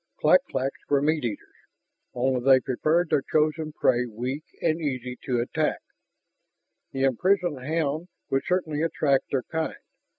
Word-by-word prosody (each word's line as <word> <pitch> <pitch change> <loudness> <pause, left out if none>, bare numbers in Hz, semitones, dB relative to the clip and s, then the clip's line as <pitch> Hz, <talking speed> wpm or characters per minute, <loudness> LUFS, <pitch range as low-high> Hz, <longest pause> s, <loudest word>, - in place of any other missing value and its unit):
Clak 275 - +6
claks 135 +1 -2
were 145 - +4
meat 150 +1 +1
eaters, 115 -4 -4 0.7
only 125 0 0
they 135 0 +7
preferred 155 +7 0
their 140 - +3
chosen 155 +2 0
prey 125 -4 +2
weak 125 +6 -4 0.2
and 165 0 0
easy 125 -4 -3
to 125 -2 0
attack. 120 - 0 1.1
The 135 0 -2
imprisoned 165 - +1
hound 155 +2 -1 0.2
would 135 - +2
certainly 160 -5 0
attract 145 -4 +1
their 130 -3 0
kind. 160 +3 -3
140 Hz, 140 wpm, -26 LUFS, 130-160 Hz, 1.1 s, they